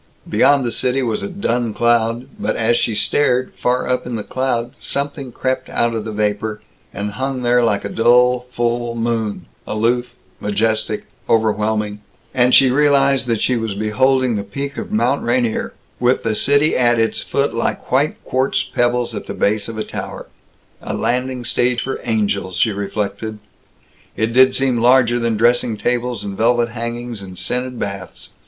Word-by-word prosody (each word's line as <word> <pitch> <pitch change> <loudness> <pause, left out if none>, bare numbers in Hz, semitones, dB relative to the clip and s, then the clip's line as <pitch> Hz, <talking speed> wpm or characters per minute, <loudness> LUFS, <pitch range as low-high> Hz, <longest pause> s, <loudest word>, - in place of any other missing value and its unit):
Beyond 140 -2 +3
the 120 - -1
city 125 +4 0
was 115 -3 -1
a - - -3
dun 120 - -1
cloud, 120 +1 +2
but 105 - -1
as 115 +1 +2
she 115 -2 0
stared, 130 +1 +1
far 125 +1 0
up 125 -1 -1
in 125 - -3
the 105 - -3
cloud 125 -1 -2
something 140 -2 -3
crept 130 +2 -2
out 120 0 +1
of 110 -1 -3
the 110 - -4
vapor, 105 0 -1 0.3
and 105 +1 -4
hung 130 +3 -3
there 120 0 +3
like 105 -3 +1
a - - 0
dull 125 +2 +3
full 120 -1 -1
moon, 115 -2 -2 0.2
aloof, 120 +3 0 0.2
majestic, 110 +2 -1 0.2
overwhelming, 105 -1 +1 0.3
and 125 -1 +4
she 130 -2 +7
realized 140 -2 +3
that 115 -2 0
she 125 - +2
was 115 -3 -2
beholding 125 +3 +2
the 100 - -3
peak 140 +8 -5
of - - -6
Mount 120 +6 +1
Rainier, 120 -2 0 0.3
with 125 +1 +2
the 110 - 0
city 145 +7 +3
at 120 -1 +3
its 115 0 +1
foot - - -1
like - - -2
white - - +2
quartz 130 +1 0
pebbles 120 0 0
at 105 - -6
the - - -5
base 105 0 0
of 115 -1 -6
a 110 - -1
tower. - - -6 0.6
A - - -4
landing 125 0 -1
stage 120 0 +1
for 135 - -4
angels, 100 -5 -1
she 105 +5 +2
reflected. 100 +1 -3 0.8
It 110 +2 0
did 130 +1 +5
seem 130 -3 +1
larger 120 0 +4
than 115 -2 0
dressing 120 0 +2
tables 125 +1 -1
and 100 -1 -5
velvet 120 +2 +2
hangings 120 -1 -5
and 95 -2 -10
scented 125 +6 -3
baths. 100 -3 -6
120 Hz, 170 wpm, -19 LUFS, 110-125 Hz, 0.8 s, she